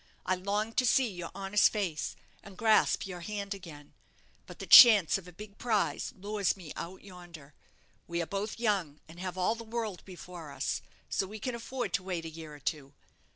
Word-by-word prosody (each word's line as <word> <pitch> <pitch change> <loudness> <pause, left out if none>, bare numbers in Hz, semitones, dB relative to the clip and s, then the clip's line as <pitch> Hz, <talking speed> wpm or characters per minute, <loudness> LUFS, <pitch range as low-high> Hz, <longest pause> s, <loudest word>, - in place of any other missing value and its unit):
I 185 - +2
long 205 +4 -2
to 255 - +3
see 260 +3 +4
your 175 -5 -6
honest 195 +1 +3
face, 185 -8 -2 0.3
and 195 -2 -13
grasp 220 -1 +3
your 180 -2 -7
hand 200 +2 -4
again; 160 -7 -12 0.5
but - - -11
the - - -7
chance 205 - +9
of 180 - -15
a - - -10
big 200 +3 -12
prize 205 -11 0
lures 200 0 -1
me 170 -5 -9
out 180 +3 -7
yonder. 175 -6 -12 0.5
We 170 0 -2
are 170 - -1
both 200 +5 -4
young, 190 -10 0
and 165 +2 -13
have 185 0 -5
all 185 +4 +2
the 230 0 -8
world 220 -4 -4
before 180 -3 -10
us, - - -2 0.3
so 190 - -1
we 215 +3 -8
can 250 +4 -4
afford 245 +2 -4
to - - +1
wait 180 -3 -4
a - - -4
year 160 -2 -10
or - - -13
two. 145 -1 -4
190 Hz, 200 wpm, -30 LUFS, 170-210 Hz, 0.5 s, chance